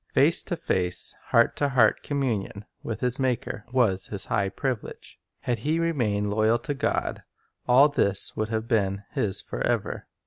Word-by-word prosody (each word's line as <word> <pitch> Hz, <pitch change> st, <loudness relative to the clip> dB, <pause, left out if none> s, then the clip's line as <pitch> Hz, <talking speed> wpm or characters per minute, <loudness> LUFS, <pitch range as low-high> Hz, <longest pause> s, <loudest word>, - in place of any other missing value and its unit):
Face -, -, +5 dB
to -, -, -4 dB
face, 90 Hz, -1 st, 0 dB
heart -, -, +3 dB
to 145 Hz, -, +1 dB
heart 120 Hz, -5 st, +3 dB
communion 115 Hz, -8 st, -2 dB, 0.2 s
with 115 Hz, -1 st, -5 dB
his 125 Hz, +1 st, -1 dB
Maker 125 Hz, -3 st, -2 dB
was 105 Hz, -7 st, +2 dB
his 100 Hz, -2 st, -4 dB
high 100 Hz, -3 st, 0 dB
privilege. 130 Hz, +2 st, -5 dB, 0.2 s
Had 120 Hz, -2 st, -1 dB
he 155 Hz, +8 st, 0 dB
remained 120 Hz, -12 st, 0 dB
loyal 110 Hz, +2 st, +2 dB
to 130 Hz, +5 st, -4 dB
God, 135 Hz, -, -1 dB, 0.5 s
all 130 Hz, +4 st, +7 dB
this 100 Hz, -10 st, 0 dB
would 110 Hz, 0 st, -2 dB
have 110 Hz, 0 st, -2 dB
been 100 Hz, -4 st, 0 dB
his 100 Hz, -3 st, -1 dB
forever. -, -, -2 dB
115 Hz, 160 wpm, -26 LUFS, 100-130 Hz, 0.5 s, all